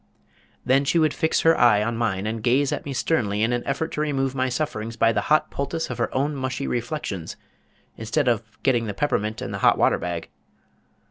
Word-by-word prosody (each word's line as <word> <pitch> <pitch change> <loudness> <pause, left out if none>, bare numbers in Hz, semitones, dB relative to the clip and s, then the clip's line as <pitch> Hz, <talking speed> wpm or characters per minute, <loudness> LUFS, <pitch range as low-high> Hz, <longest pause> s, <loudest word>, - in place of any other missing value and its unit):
_ - - -40 0.6
Then 135 +2 +3
she 140 +5 +1
would 155 -2 +3
fix 160 -2 +1
her 165 0 +5
eye 105 -4 +4
on 115 +2 -2
mine, 105 -4 -1
and 110 +1 -3
gaze 130 +5 +2
at - - -3
me 140 - -4
sternly 110 -7 0
in 115 +2 +1
an 120 - -1
effort 160 +4 -1
to 150 - -2
remove 135 -3 0
my 130 -1 0
sufferings 115 -4 -3
by 115 - +4
the - - 0
hot 155 0 +3
poultice 150 +1 -3
of 125 - -6
her 115 - 0
own 145 +3 0
mushy 130 0 -3
reflections 115 - -4 0.6
instead 125 +6 -1
of 120 -2 +2 0.2
getting 120 -4 +2
the 105 - -4
peppermint 110 -5 -1
and - - -5
the - - -4
hot - - +4
water - - +3
bag. 85 -2 -4
125 Hz, 215 wpm, -24 LUFS, 110-145 Hz, 0.6 s, her